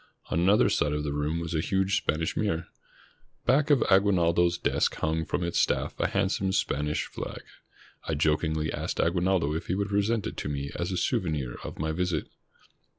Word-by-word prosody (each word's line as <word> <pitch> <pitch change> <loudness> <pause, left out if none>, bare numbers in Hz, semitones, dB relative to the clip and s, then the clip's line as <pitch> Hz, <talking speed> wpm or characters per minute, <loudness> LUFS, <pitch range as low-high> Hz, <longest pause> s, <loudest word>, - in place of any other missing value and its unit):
On - - +1
another 95 +5 +4
side 75 - +1
of 75 0 -1
the 75 -1 -2
room 75 +3 -1
was 85 0 -4
a 80 - +1
huge 95 +3 +1
Spanish 80 -2 -1
mirror. 85 -6 -1 0.8
Back 140 +5 +3
of 145 -3 +5
Aguinaldo's 90 -3 +3
desk - - +1
hung 80 +1 -1
from 85 - -2
its 85 0 0
staff - - +1
a - - +2
handsome 95 0 0
Span 75 -3 0
ish 75 - -1
flag. - - -7 0.6
I 80 - 0
jokingly 75 +1 +1
asked - - -3
Aguinaldo 85 -3 +2
if 80 - -4
he 90 - 0
would 100 +1 -1
present 100 +2 +1
it - - -5
to - - -3
me 70 0 -3
as 85 +2 -2
a 90 - -1
souvenir 75 -11 -1
of - - -7
my 80 +1 -1
visit. 90 -1 -1
85 Hz, 190 wpm, -28 LUFS, 75-95 Hz, 0.8 s, of